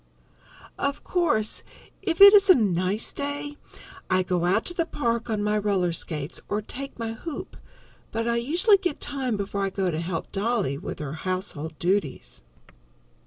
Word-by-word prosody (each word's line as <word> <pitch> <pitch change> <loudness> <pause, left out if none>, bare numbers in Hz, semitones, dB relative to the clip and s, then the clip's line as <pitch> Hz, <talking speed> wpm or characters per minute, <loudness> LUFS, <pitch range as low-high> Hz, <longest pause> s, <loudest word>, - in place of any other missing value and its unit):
Of 280 0 -2
course, 300 -12 +1 0.4
if 370 -2 -1
it 400 +1 +12
is 400 -1 +6
a 370 - +10
nice 195 -1 0
day, 290 0 -4 0.5
I 185 0 +3
go 180 -1 0
out 190 +5 +2
to 350 - -4
the 335 -1 -1
park 235 -6 -1
on 210 -2 0
my 210 0 +1
roller 195 -4 +1
skates, 155 -2 -5
or 205 - 0
take 270 +6 -7
my 225 -1 -3
hoop, 310 +7 -7 0.6
but 230 +1 -2
I 235 0 +1
usually 345 - +4
get 355 -6 -2
time 265 -6 -2
before 200 0 -2
I 195 - +1
go 190 -1 -1
to 160 0 -2
help 170 -1 -4
Dolly 205 - 0
with 145 - -6
her 150 -2 -5
household 160 -3 -4
duties. 150 - -1
210 Hz, 165 wpm, -25 LUFS, 185-285 Hz, 0.6 s, it